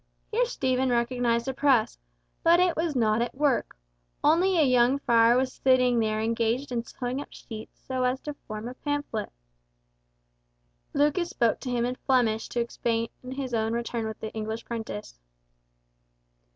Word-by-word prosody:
Here 480 +3 +2
Stephen 260 - 0
recognised 235 0 +1
a 265 - -1
press, 260 - +2 0.4
but 340 +1 +5
it 360 -2 +3
was 325 -2 -1
not 220 -2 +2
at 240 - -2
work, 280 -3 0 0.5
only 350 +5 +4
a 320 - +5
young 250 +1 +4
friar 235 -3 +4
was 260 0 0
sitting 250 -2 +3
there 215 -1 0
engaged 230 +4 0
in 235 -1 -1
sewing 250 +3 -4
up - - -8
sheets 220 -1 -10
so 260 -1 -1
as 250 +1 +1
to 295 - -5
form 215 +1 -5
a 250 - -6
pamphlet. 290 -6 -3 1.6
Lucas 300 +5 +2
spoke 235 -2 +1
to 260 - -5
him 240 -1 0
in 250 - -1
Flemish 230 -4 +1
to 240 - -2
explain 230 -1 -1 0.2
his 265 -2 -4
own 220 0 0
return 235 -1 -2
with 220 - -6
the 220 - -5
English 220 +1 -4
prentice. 105 - -6
245 Hz, 160 wpm, -27 LUFS, 230-270 Hz, 1.6 s, but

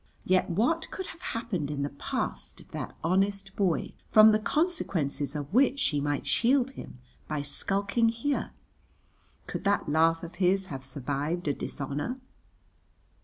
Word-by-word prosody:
Yet 185 0 +3
what 245 - +1
could 380 - -5
have 340 - -10
happened 210 - -3
in 145 -1 -2
the 140 - -1
past 140 - -4
of - - -17
that - - -5
honest 195 +2 +1
boy 185 -5 0 0.2
from 215 0 +8
the 215 - +3
consequences 170 - -1
of 145 +3 -5
which 270 +3 +4
she 145 - +1
might 145 0 -1
shield 260 +2 +3
him 260 - -10 0.3
by 150 -2 -2
skulking 200 +9 +1
here? 235 +5 -1 1.0
Could - - -5
that 200 0 +2
laugh 165 +2 +3
of 170 +1 -8
his 190 +1 +3
have 135 -1 -6
survived 145 +5 -3
a 145 - +2
dishonour? 145 - -4
185 Hz, 150 wpm, -29 LUFS, 145-230 Hz, 1.0 s, from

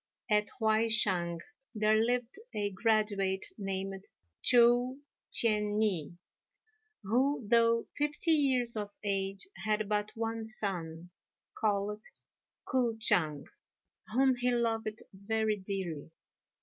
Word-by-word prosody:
At 210 0 +3
Huai 220 0 +2
shang 175 -6 +2 0.3
there 215 +1 +3
lived 245 - -1 0.2
a 205 -1 -1
graduate 200 -2 0
named 195 -1 -4 0.4
Chou 245 +2 +4 0.3
T'ien 210 -2 +2
i, 175 -6 -1 0.9
who, 250 +4 0
though 230 0 +3
fifty 295 +3 +1
years 260 -6 +2
of 210 -1 -3
age, 195 - -2
had 215 -1 -1
but 210 0 -1
one 225 0 -3
son, 180 -6 -3 0.4
called 210 0 -1 0.6
K'o 240 -3 0
ch'ang, 155 -9 +3 0.7
whom 265 +3 +3
he 245 +1 +1
loved 225 -3 -1
very 215 +2 -1
dearly. 190 -7 -5
215 Hz, 105 wpm, -31 LUFS, 195-230 Hz, 0.9 s, Chou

